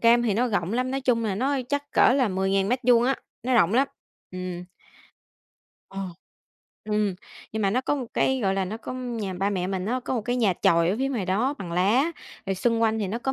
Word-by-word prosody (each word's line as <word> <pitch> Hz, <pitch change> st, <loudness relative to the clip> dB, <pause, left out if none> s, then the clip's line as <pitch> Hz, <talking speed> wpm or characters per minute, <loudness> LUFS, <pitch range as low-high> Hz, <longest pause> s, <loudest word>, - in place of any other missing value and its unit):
cam 235 Hz, +1 st, +5 dB
thì 220 Hz, -4 st, +1 dB
nó 245 Hz, +3 st, +1 dB
rộng 190 Hz, -3 st, -1 dB
lắm, 255 Hz, +2 st, 0 dB
nói 270 Hz, +1 st, -1 dB
chung 240 Hz, -3 st, +1 dB
là 200 Hz, -3 st, 0 dB
nó 260 Hz, +7 st, 0 dB
á 270 Hz, -, 0 dB
chắc 285 Hz, +1 st, -2 dB
cỡ -, -, +5 dB
là 255 Hz, -4 st, +2 dB
10.000 190 Hz, +1 st, +1 dB
mét 250 Hz, +3 st, +1 dB
vuông 240 Hz, -1 st, +5 dB
á, 265 Hz, +2 st, +2 dB, 0.3 s
nó 255 Hz, +1 st, 0 dB
rộng 210 Hz, -2 st, +4 dB
lắm. 275 Hz, +2 st, +3 dB, 0.4 s
Ừm. 180 Hz, -1 st, -5 dB, 1.3 s
Ờ. 195 Hz, -, -6 dB, 0.8 s
Ừm, 210 Hz, -2 st, 0 dB, 0.4 s
nhưng 220 Hz, -1 st, -2 dB
mà 195 Hz, -, +2 dB
nó 250 Hz, -, +1 dB
có 275 Hz, -, 0 dB
một 255 Hz, -3 st, -4 dB
cái 265 Hz, -1 st, +2 dB
gọi 195 Hz, -2 st, +1 dB
là 195 Hz, -, 0 dB
nó 205 Hz, +4 st, -5 dB
có 230 Hz, -, -7 dB
nhà 235 Hz, -7 st, -4 dB
ba 195 Hz, +3 st, 0 dB
mẹ 185 Hz, -3 st, -1 dB
mình 190 Hz, 0 st, -3 dB
á, 250 Hz, +4 st, -1 dB
có -, -, -2 dB
một 235 Hz, -, -1 dB
cái 245 Hz, +3 st, -1 dB
nhà 220 Hz, -6 st, +3 dB
chòi 170 Hz, +1 st, +4 dB
ở 205 Hz, -, -1 dB
phía 270 Hz, -, 0 dB
ngoài 230 Hz, -9 st, -2 dB
đó 235 Hz, +10 st, +1 dB
bằng 175 Hz, -3 st, -6 dB
lá, 225 Hz, -, +2 dB, 0.3 s
rồi 195 Hz, -, 0 dB
xung 230 Hz, +4 st, +1 dB
quanh 220 Hz, 0 st, +2 dB
thì 205 Hz, -, -1 dB
nó 225 Hz, +5 st, -2 dB
có 265 Hz, +2 st, -2 dB
225 Hz, 250 wpm, -25 LUFS, 195-255 Hz, 1.3 s, cam